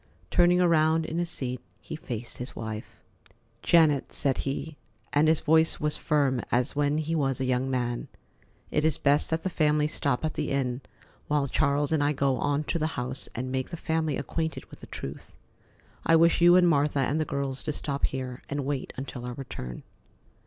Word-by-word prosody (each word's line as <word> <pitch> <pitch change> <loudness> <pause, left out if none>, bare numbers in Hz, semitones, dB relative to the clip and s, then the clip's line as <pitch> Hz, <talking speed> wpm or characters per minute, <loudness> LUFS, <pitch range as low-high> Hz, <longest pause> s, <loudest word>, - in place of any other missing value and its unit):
Turning 175 0 +4
around 160 -2 +3
in 160 +2 -3
his 175 -1 -1
seat, 125 -6 -3 0.2
he - - -7
faced 120 -6 -7
his 125 - -6
wife. 110 -1 -6 0.7
"Janet," 155 -5 +3
said 135 -2 +1
he, 145 +3 -3 0.4
and 150 +2 +4
his 160 0 +3
voice 160 0 +3
was 150 0 0
firm 140 -6 +1
as 125 +3 +1
when 145 +1 +1
he 155 +1 -2
was 135 -5 0
a 130 - 0
young 130 +1 0
man, 120 -2 -2 0.6
"it 150 - +1
is 160 -1 +3
best 145 +1 +3
that 160 0 -1
the - - 0
family 150 -2 +2
stop 145 -2 -1
at 155 - -2
the - - -2
inn 130 -2 -1 0.5
while 145 -2 +1
Charles 140 +1 +1
and 155 -2 +2
I 145 +1 +2
go 135 -2 +1
on 145 +3 0
to 170 - -2
the 155 - +1
house 125 +1 -2
and 130 +2 -3
make 130 0 -2
the 170 - -6
family 160 -3 -1
acquainted 160 +3 -3
with - - -12
the - - -11
truth. 70 - -8 0.7
I 165 - +4
wish 165 +1 +4
you 175 +1 +7
and 180 -1 +6
Martha 145 -3 +2
and 140 +4 0
the - - +2
girls 140 -2 -3
to 155 - -2
stop 140 -1 -2
here 130 -1 -5
and 140 -1 -2
wait 140 -2 -3
until 130 -2 -6
our 125 - -5
return." 65 - -7
145 Hz, 195 wpm, -27 LUFS, 130-160 Hz, 0.7 s, you